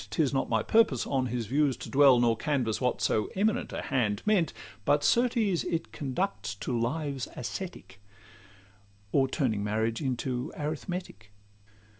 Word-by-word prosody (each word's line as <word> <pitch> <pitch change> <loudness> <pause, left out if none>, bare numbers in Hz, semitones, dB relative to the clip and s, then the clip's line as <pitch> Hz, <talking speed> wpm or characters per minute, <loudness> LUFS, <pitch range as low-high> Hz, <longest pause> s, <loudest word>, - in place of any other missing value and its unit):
'Tis 145 -5 +1
not 135 - 0
my 110 -1 +1
purpose 220 - +3
on 130 -2 0
his 120 -1 -2
views 140 +3 +1
to - - -8
dwell 135 -3 +6
Nor 120 -1 +3
canvass 125 -4 -1
what 125 -1 0
so 105 -1 +1
'eminent 210 +3 0
a - - -4
hand' 110 -7 0
meant; 195 -8 +3 0.3
But 145 +6 +2
certes 230 -7 +2
it 165 -1 -3
conducts 140 - -3
to 120 +5 -3
lives 135 +3 -2
ascetic, 120 - -7 1.1
Or 135 -2 +3
turning 120 -8 -1
marriage 110 +3 -1
into 125 -2 -2
arithmetic. 155 - -5
135 Hz, 145 wpm, -29 LUFS, 115-160 Hz, 1.1 s, dwell